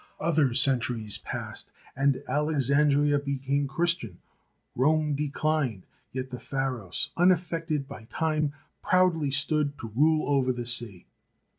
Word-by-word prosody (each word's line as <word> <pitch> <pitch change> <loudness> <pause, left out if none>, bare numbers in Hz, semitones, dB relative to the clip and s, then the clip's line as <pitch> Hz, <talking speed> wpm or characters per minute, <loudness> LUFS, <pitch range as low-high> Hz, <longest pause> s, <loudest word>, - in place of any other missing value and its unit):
Other 155 -6 +1
centuries 120 -6 +4
passed - - -7 0.3
and 140 0 +1
Alexandria 145 0 +2
became 140 0 -2
Christian; 135 - -2 0.6
Rome 150 +3 +2
declined, 145 -6 -1 0.3
yet 130 0 -5
the 125 - -6
Pharos, 130 -8 -3
unaffected 165 -4 +1
by 110 - -10
time, 155 -2 0 0.3
proudly 180 -5 +2
stood 145 +1 -1
to 115 - -7
rule 155 +3 +3
over 135 -3 +2
the 120 -1 -5
sea. 115 -6 -2
140 Hz, 115 wpm, -27 LUFS, 130-155 Hz, 0.6 s, centuries